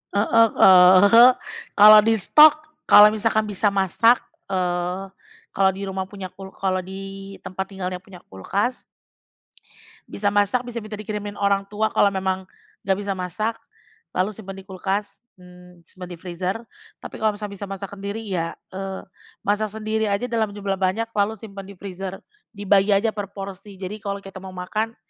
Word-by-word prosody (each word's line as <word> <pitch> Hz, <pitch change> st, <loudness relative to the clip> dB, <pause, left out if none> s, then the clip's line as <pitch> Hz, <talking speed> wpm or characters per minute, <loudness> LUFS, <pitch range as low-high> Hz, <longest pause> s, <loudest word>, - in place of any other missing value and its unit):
Heeh, 225 Hz, +2 st, +4 dB
eee, 190 Hz, +6 st, +8 dB, 0.4 s
kalau 215 Hz, +1 st, +9 dB
distok, 225 Hz, +8 st, +6 dB, 0.3 s
kalau 210 Hz, +1 st, +9 dB
misalkan 220 Hz, 0 st, 0 dB
bisa 210 Hz, 0 st, -1 dB
masak, 200 Hz, +5 st, +3 dB, 0.2 s
eee, 180 Hz, 0 st, -2 dB, 0.5 s
kalau 195 Hz, -1 st, +3 dB
di 195 Hz, -, -6 dB
rumah 190 Hz, 0 st, -3 dB
punya 190 Hz, -1 st, -8 dB
kul 195 Hz, 0 st, -11 dB
kalau 190 Hz, -1 st, -1 dB
di 195 Hz, +1 st, -8 dB
tempat 190 Hz, +1 st, -4 dB
tinggalnya 185 Hz, -2 st, -5 dB
punya 185 Hz, -1 st, -15 dB
kulkas 200 Hz, -, -3 dB, 1.2 s
bisa 205 Hz, 0 st, -1 dB
masak, 205 Hz, +4 st, +1 dB
bisa 245 Hz, -1 st, -6 dB
minta 215 Hz, -1 st, -8 dB
dikirimin 210 Hz, -1 st, -6 dB
orang 200 Hz, 0 st, 0 dB
tua, 215 Hz, +1 st, -1 dB
kalau -, -, +4 dB
memang 190 Hz, -1 st, -2 dB, 0.4 s
nggak 190 Hz, -1 st, +2 dB
bisa 200 Hz, 0 st, -4 dB
masak, 190 Hz, +4 st, -3 dB, 0.6 s
lalu 185 Hz, +4 st, 0 dB
simpen 195 Hz, -2 st, -10 dB
di 195 Hz, -, -11 dB
kulkas, 195 Hz, +2 st, -4 dB, 0.2 s
mmm, 180 Hz, -1 st, -17 dB
simpen 180 Hz, +1 st, -11 dB
di 175 Hz, -, -8 dB
freezer. 180 Hz, +2 st, -4 dB, 0.5 s
Tapi -, -, -8 dB
kalau 215 Hz, -1 st, +1 dB
misalnya 205 Hz, -1 st, -7 dB
bisa 200 Hz, -, -6 dB
masak 195 Hz, 0 st, -7 dB
sendiri 200 Hz, +2 st, -6 dB
ya, 175 Hz, -5 st, -3 dB, 0.2 s
eee, 190 Hz, 0 st, -6 dB, 0.4 s
masak 210 Hz, +2 st, 0 dB
sendiri 220 Hz, +1 st, -2 dB
aja 200 Hz, +2 st, -1 dB
dalam 220 Hz, -3 st, -1 dB
jumlah 195 Hz, -2 st, -3 dB
banyak, 195 Hz, +5 st, -1 dB
lalu 210 Hz, 0 st, 0 dB
simpen 195 Hz, -2 st, -10 dB
di 200 Hz, -, -11 dB
freezer. 190 Hz, 0 st, -7 dB, 0.3 s
Dibagi 200 Hz, 0 st, +3 dB
aja 220 Hz, +3 st, +1 dB
per 205 Hz, -2 st, -5 dB
porsi, 195 Hz, 0 st, -8 dB
jadi 190 Hz, +3 st, -7 dB
kalau 200 Hz, 0 st, -5 dB
kita 195 Hz, -1 st, -10 dB
mau 185 Hz, 0 st, -10 dB
makan, 215 Hz, +5 st, -3 dB
195 Hz, 160 wpm, -22 LUFS, 190-210 Hz, 1.2 s, kalau